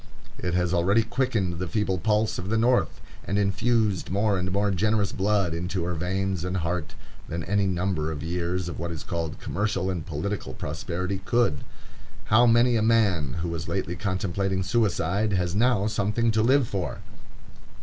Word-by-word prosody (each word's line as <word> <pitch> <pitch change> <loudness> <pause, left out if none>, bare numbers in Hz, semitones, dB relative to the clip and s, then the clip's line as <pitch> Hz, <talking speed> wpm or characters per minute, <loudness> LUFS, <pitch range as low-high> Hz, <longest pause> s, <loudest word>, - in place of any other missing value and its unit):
It 90 -1 -1
has 90 0 +1
already 95 +6 +3
quickened 110 -8 -1
the 90 - -2
feeble 95 -1 0
pulse 105 +1 +1
of 90 +2 -5
the 110 - +1
North, 120 +2 +2 0.2
and 100 - -1
infused 105 0 +1
more 100 +2 +1
and 90 0 -1
more 100 +1 +1
generous 105 +1 +1
blood 95 -3 +1
into 90 +2 -2
her 90 +1 -2
veins 95 +1 -1
and 90 +1 -2
heart, 85 -1 -2 0.3
than 85 0 -3
any 100 +3 +1
number 90 -4 -1
of 75 -1 -5
years 90 +1 -2
of 85 - -6
what 85 +1 -3
is 80 -2 -6
called 85 -4 -4
commercial 95 -1 -1
and 85 -4 -3
political 95 +6 -4
prosperity 90 +5 -3
could. 120 -7 +2 0.7
How 120 +3 +5
many 120 +1 +4
a - - +1
man 100 - +2
who 85 - -2
was 85 -1 -4
lately 95 -2 -2
contemplating 95 +1 -1
suicide 100 0 +1
has 90 -2 0
now 110 -1 +2
something 110 +2 +1
to 110 0 +2
live 130 +2 +4
for! 95 -5 -3
95 Hz, 170 wpm, -26 LUFS, 90-105 Hz, 0.7 s, How